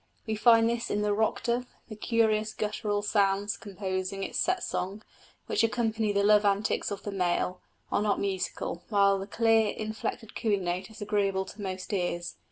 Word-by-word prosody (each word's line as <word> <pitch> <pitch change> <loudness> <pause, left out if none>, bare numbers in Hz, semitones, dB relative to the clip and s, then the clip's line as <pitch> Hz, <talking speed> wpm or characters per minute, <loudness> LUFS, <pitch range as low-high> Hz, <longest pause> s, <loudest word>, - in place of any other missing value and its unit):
We 220 - -2
find 225 +1 +6
this 235 0 -1
in 210 0 0
the 210 0 +2
rock 220 +1 0
dove: 245 +1 0 0.2
the 215 - -8
curious 215 -1 +1
guttural 210 -1 -1
sounds 205 0 +1
composing 190 -1 -4
its - - -3
set 370 0 +1
song, 195 +4 -3 0.4
which - - +1
accompany 225 -2 +1
the 200 0 +2
love 210 0 +5
antics 200 +1 +1
of 200 -1 -5
the 205 - -4
male, 180 -1 0 0.3
are - - +2
not 210 -1 +1
musical, 190 -3 -2
while 200 -2 +4
the 195 - -6
clear 225 0 +3
inflected 220 +1 -5
cooing 205 -4 0
note 180 +2 -2
is 220 -1 -8
agreeable 200 -2 0
to 205 +2 -10
most 190 +1 -5
ears. 175 -2 -1
205 Hz, 175 wpm, -29 LUFS, 195-220 Hz, 0.4 s, find